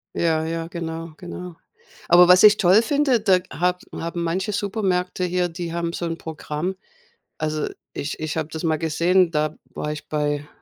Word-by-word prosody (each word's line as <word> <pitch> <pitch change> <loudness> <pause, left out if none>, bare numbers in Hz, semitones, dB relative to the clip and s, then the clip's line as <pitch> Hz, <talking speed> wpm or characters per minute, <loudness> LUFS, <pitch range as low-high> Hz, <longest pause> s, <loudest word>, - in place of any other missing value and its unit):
Ja, 160 -2 +1
ja, 165 0 -3
genau, 165 -1 -6
genau. 180 -1 -8 0.5
Aber 175 +1 +8
was 180 +1 +7
ich 210 0 +8
toll 190 +2 +5
finde, 275 0 +2
da 190 -4 +4
hab 180 +1 0
haben 170 +1 -4
manche 185 +5 -1
Supermärkte 190 -3 -1
hier, 180 0 0
die 170 0 -5
haben 170 0 -2
so 170 - -3
'n 165 -1 -3
Programm. 160 +3 -4 0.6
Also, 155 -1 -2 0.3
ich 145 +1 -4
ich 155 0 -3
habe 160 -1 -2
das 160 +1 -6
mal 160 -2 +1
gesehen, 170 +3 +2
da 155 -1 0 0.2
war 150 - -3
ich 150 -1 -7
bei 145 -1 -1
170 Hz, 175 wpm, -23 LUFS, 160-180 Hz, 0.6 s, Aber